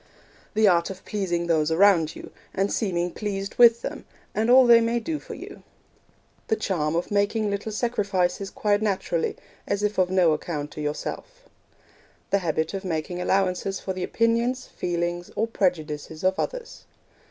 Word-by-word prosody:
The 215 0 +5
art 170 -3 +3
of 190 -1 -9
pleasing 175 -5 -1
those 160 -2 +2
around 165 -2 +4
you, - - -10 0.2
and 195 +1 0
seeming 175 -4 -1
pleased 200 -1 -4
with 235 -1 +7
them, - - -5 0.3
and 220 +2 0
all 255 +1 +8
they 235 -1 +7
may 230 +1 +1
do 305 +6 -3
for - - -9
you. - - -10 0.9
The 220 - +2
charm 165 -8 -1
of 170 +4 -2
making 205 +1 +1
little 200 +2 -3
sacrifices 200 -5 0
quite 205 +1 0
naturally, 190 -5 -1 0.3
as 200 +1 -1
if 210 -1 0
of 180 -1 +3
no 180 -3 +4
account 150 -1 -4
to 150 - -7
yourself. - - -5 0.9
The 200 - +3
habit 160 -2 -1
of 195 0 -4
making 175 0 -3
allowances 190 0 0
for 190 - -4
the 185 -1 -4
opinions, 235 +4 +1
feelings, 175 0 -3
or 225 - +1
prejudices 160 -7 -2
of 190 +1 +2
others. - - -5
195 Hz, 165 wpm, -25 LUFS, 175-215 Hz, 0.9 s, all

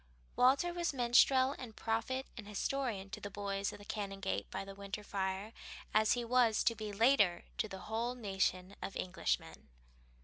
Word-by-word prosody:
Walter 275 +8 +4
was 345 -4 -1
minstrel 260 +2 +5
and 235 -4 -8
prophet 230 +4 -1
and 215 -4 -8
historian 210 -2 -2
to - - -6
the 205 - -5
boys 200 0 -2
of - - -9
the 205 - -13
Canongate 195 -2 -3
by - - -4
the 195 - -8
winter 200 +1 -6
fire, 195 +2 -3 0.4
as 215 0 +5
he 245 -1 -2
was 235 -2 +3
to 230 - +3
be 215 -2 -5
later 205 -5 +4 0.2
to 225 - +1
the 190 -2 -8
whole 230 +4 -2
nation 195 -4 -1
of 195 - -5
Englishmen. 185 -1 -2
215 Hz, 170 wpm, -35 LUFS, 195-245 Hz, 0.4 s, minstrel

